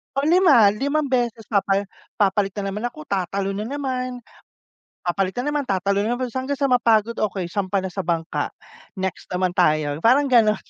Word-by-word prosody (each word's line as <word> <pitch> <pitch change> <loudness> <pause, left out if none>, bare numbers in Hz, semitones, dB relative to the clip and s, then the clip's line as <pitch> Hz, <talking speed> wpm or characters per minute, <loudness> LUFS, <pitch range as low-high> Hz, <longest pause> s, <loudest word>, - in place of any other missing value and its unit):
Pang-lima, 280 - +5
5 285 +7 0
beses 240 -4 -1
papa 200 -1 +1 0.3
papalit 200 -1 +1
na 195 -1 -3
naman 210 +3 -5
ako, 155 - -12
tatalon 195 +1 -2
na - - -4
naman. 255 -2 -3 0.9
Papalit 185 +2 -1
na 245 - -2
naman, 295 -1 -1
tatalon 200 +2 0
na 235 - 0
naman 255 0 -3
hanggang 260 +3 -2
sa 275 -2 +1
mapagod. 230 -2 +3
Okey, 190 -4 -2
sampa 195 0 -1
na 190 - -3
sa - - -4
bangka. 165 -1 -2 0.4
Next 190 -2 -4
naman 185 0 0
tayo, 155 -5 +1
parang 270 +8 +4
gano'n. 220 -3 +5
210 Hz, 170 wpm, -22 LUFS, 190-255 Hz, 0.9 s, Pang-lima